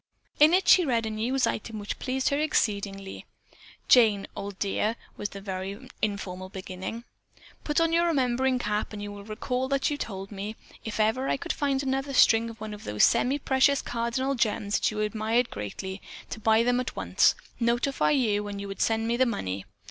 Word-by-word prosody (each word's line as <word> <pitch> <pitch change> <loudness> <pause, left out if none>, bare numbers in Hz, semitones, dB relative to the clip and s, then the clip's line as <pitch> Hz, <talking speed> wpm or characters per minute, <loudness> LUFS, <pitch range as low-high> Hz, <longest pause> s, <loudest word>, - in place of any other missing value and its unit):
In 310 +4 +7
it 380 - +1
she 365 - +7
read 235 -6 +1
a 220 - -3
news 245 +5 0
item 220 0 -3
which 205 -1 -5
pleased 260 0 0
her 280 - 0
exceedingly. 200 -9 -1 0.6
"Jane, 215 -5 +5
old 200 -1 -6
dear" 210 +3 0 0.2
was 205 - -4
the 200 - -9
very 195 +5 -5
informal 185 -3 -3
beginning. 190 +4 -6 0.6
"Put 295 +1 +1
on 330 0 +2
your 340 +1 +3
remembering 260 -4 +1
cap 210 -3 -2
and 205 - -6
you 205 - -5
will 205 0 -9
recall 250 +5 -2
that 275 +1 +1
you 290 - -1
told 195 -2 -5
me, 205 +2 -5 0.3
if 220 -1 -5
ever 220 +5 +1
I - - +1
could 340 +5 -3
find 280 -2 0
another 270 +1 -1
string 230 -1 +5
of 215 -2 -8
those 105 0 +1
semi 265 +4 +4
precious 270 0 +2
cardinal 240 +3 -1
gems 215 -4 0
that - - +2
you 215 - -6
so - - -8 0.4
greatly 105 - -5
admired, - - -14
to - - -5
buy 220 +1 +4
them 245 +1 +2
at 250 - -4
once, - - +3 0.2
notify 240 +3 +1
you 215 -8 +1
and 200 -1 -5
you 200 - -5
would 195 - -6
send 225 0 +1
me 235 +1 +1
the 260 0 +4
money. 95 - -3
225 Hz, 195 wpm, -27 LUFS, 205-265 Hz, 0.6 s, In